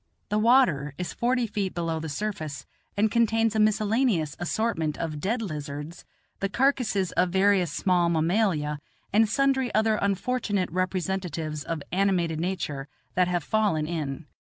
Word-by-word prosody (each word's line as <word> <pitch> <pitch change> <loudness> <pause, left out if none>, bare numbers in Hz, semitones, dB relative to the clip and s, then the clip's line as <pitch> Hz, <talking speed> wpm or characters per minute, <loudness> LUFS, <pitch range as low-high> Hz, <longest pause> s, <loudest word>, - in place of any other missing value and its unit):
The 210 0 +1
water 215 - +3
is 180 - -4
forty 245 0 +1
feet 205 -4 -3
below 165 -2 -1
the 160 0 -5
surface, 155 -6 -4 0.3
and 210 +1 +3
contains 225 -1 +2
a - - +2
miscellaneous 215 - +2
assortment 175 -4 -1
of 155 -3 -3
dead 225 +8 -1
lizards, 150 -2 -6 0.3
the 195 - -1
carcasses 230 -5 +1
of 180 +1 +2
various 190 -2 +3
small 175 0 +2
mammalia, 165 -3 +1 0.3
and 215 +1 +4
sundry 265 0 +2
other 220 0 +3
unfortunate 200 -1 -1
representatives 180 -4 -2
of 160 -1 -4
animated 180 -4 +1
nature 160 -6 -3 0.3
that 180 -1 +3
have 175 -2 -1
fallen 205 -8 +1
in. 155 -2 -4
185 Hz, 140 wpm, -26 LUFS, 160-215 Hz, 0.3 s, and